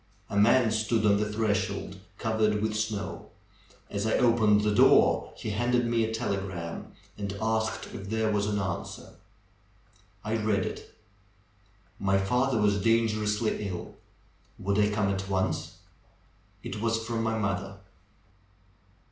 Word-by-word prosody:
A - - -3
man 115 +3 +5
stood 110 0 +1
on 100 -1 +5
the 105 +1 -1
threshold, 100 -3 -1 0.2
covered 110 -1 +1
with 110 +1 -1
snow. 105 -1 -3 0.6
As 100 +2 -2
I 110 - +1
opened 110 -4 +4
the 105 0 +1
door - - +5
he 110 - -4
handed 120 +3 +1
me 115 -1 +1
a 110 - -1
telegram 95 -7 -4 0.3
and 100 -1 -4
asked: 110 0 -1
if 100 -3 -7
there 110 0 0
was 105 -1 0
an 105 0 0
answer. 95 -3 -4 1.1
I 110 +1 -1
read 105 -3 +1
it. - - -7 1.1
My 95 0 +2
father 125 +5 +1
was 100 -1 +2
dangerously 110 -1 +1
ill; 90 -2 -6 0.6
would 100 +2 0
I 105 0 +4
come 105 -1 0
at 95 0 -3
once? 95 -1 -1 0.9
It 105 - -5
was 115 0 0
from 115 -1 -2
my 115 0 0
mother. 95 -2 -2
105 Hz, 140 wpm, -28 LUFS, 100-110 Hz, 1.1 s, man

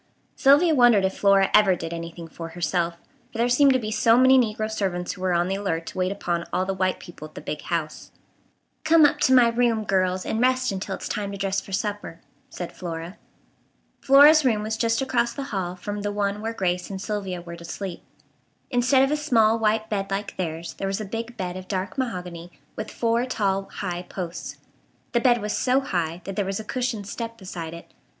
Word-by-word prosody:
Sylvia 290 +5 +5
wondered 240 -7 +5
if 190 - -1
Flora 195 -1 +4
ever 195 -3 +6
did 165 -1 -6
anything 170 0 -7
for 165 +1 -8
herself; 170 0 -1 0.4
for - - -8
there 235 +1 +2
seemed 270 +2 +5
to - - +3
be 215 -4 -4
so 230 +1 +4
many 260 +1 +6
negro 215 -2 0
servants 190 -5 -2
who 185 - -12
were 185 -1 +1
on 175 +1 +2
the 190 - -1
alert 180 -5 -2
to - - -8
wait 185 +1 +1
upon 175 -4 -2
all 185 - 0
the 195 - -1
white 185 -1 0
people 160 -3 -10
at 155 - -24
the - - -6
"big 150 - -5
house." 160 -3 -4 0.7
"Come 315 -1 +6
up 290 - +2
to - - +3
my 250 -2 +6
room, 230 -2 +1
girls, 185 -2 0
and 220 - -1
rest 255 0 +2
until 195 0 -4
it's - - -7
time 205 -1 -3
to 200 - -6
dress 195 0 -1
for - - -13
supper," 205 -3 -3 0.3
said 175 - -7
Flora. 170 +1 -6 0.8
Flora's 290 +3 +7
room 220 -5 +1
was 220 +1 -2
just 230 +3 +1
across 240 -3 0
the 280 - -5
hall 180 -2 -2
from 205 +3 -5
the 205 0 -2
one 205 0 -1
where 225 +1 -2
Grace 180 -5 -2
and 195 -1 -5
Sylvia 195 -3 -3
were 170 0 -9
to 170 - -12
sleep. 180 +1 -6 0.7
Instead 255 +2 +4
of 270 - +1
a - - +3
small 230 -7 +3
white 220 0 +1
bed 195 -2 -2
like 200 +1 -3
theirs 165 -2 -4
there 195 - -2
was 195 +1 -2
a 215 - -4
big 230 +4 -6
bed 180 -2 -4
of 185 0 -8
dark 190 -1 -3
mahogany 180 -9 -4 0.2
with - - -5
four 230 0 0
tall, 195 -5 -1
high 175 -3 -4
posts. 180 -1 -6 0.5
The 240 - +2
bed 240 0 +4
was 210 - -2
so 255 +1 +2
high 175 -9 -2
that 195 +1 -6
there 205 - 0
was 195 +1 -3
a - - -5
cushioned 240 -2 -3
step 230 +2 -5
beside 170 -5 -7
it. 170 - -13
200 Hz, 215 wpm, -24 LUFS, 180-230 Hz, 0.8 s, Flora's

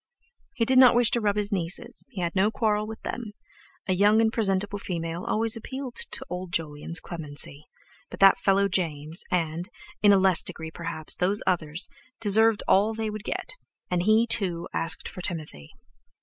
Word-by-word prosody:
He 230 - +1
did 260 +2 +4
not 255 -2 +7
wish 240 -1 +4
to 235 - 0
rub 205 -1 +1
his 210 0 0
nieces, 180 -3 -3
he 205 -8 -6
had 170 -1 -2
no 195 +2 +3
quarrel 215 -1 0
with 220 0 -8
them—a 210 -4 -7
young 205 +4 +4
and 225 0 +2
presentable 205 -2 -1
female 170 -2 -4
always 225 0 +2
appealed 260 +3 -7 0.2
to - - -4
old 180 0 -6
Jolyon's 160 0 -1
clemency—but 145 -2 -6
that 195 0 +6
fellow 200 0 +2
James, 160 -4 -1
and, 170 +1 -1 0.3
in 205 - +6
a 200 - +6
less 190 -3 +5
degree 160 0 -6
perhaps, 160 -2 -3
those 195 +4 +1
others, 165 -1 0 0.3
deserved 220 0 +4
all 210 +3 +3
they 220 -1 -3
would 215 -1 -7
get. - - -5 0.4
And 180 -1 +1
he, 215 +4 +4
too, 180 -7 -2
asked 165 - 0
for 180 - -8
Timothy. 155 - -6
195 Hz, 170 wpm, -26 LUFS, 170-215 Hz, 0.4 s, not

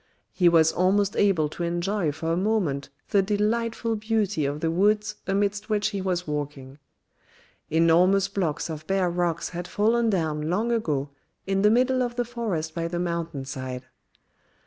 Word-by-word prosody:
He 180 -2 +4
was 160 -1 +5
almost 195 +3 +2
able 190 -7 +3
to 165 - -8
enjoy 175 0 0
for 160 +3 -2
a - - +1
moment 180 -8 0 0.2
the 200 - +4
delightful 225 +3 0
beauty 210 -6 0
of 145 +1 -3
the 160 +1 0
woods 205 +4 +1
amidst 200 +2 0
which 210 0 +1
he 200 -2 -4
was 180 -1 -1
walking. 145 -2 -5 0.9
Enormous 175 +4 +4
blocks 190 -7 -2
of 155 -1 -7
bare 190 -2 +1
rocks 170 -1 -1
had 175 0 -6
fallen 225 +4 +2
down 155 -5 -1
long 215 +7 0
ago 150 -11 -1 0.3
in 195 0 0
the 210 - +5
middle 255 +3 +3
of 240 -1 -2
the 245 0 -1
forest 210 -10 -3
by 165 0 -2
the 175 +1 -4
mountain 170 -5 -3
side. 130 -1 -6
180 Hz, 165 wpm, -25 LUFS, 160-210 Hz, 0.9 s, was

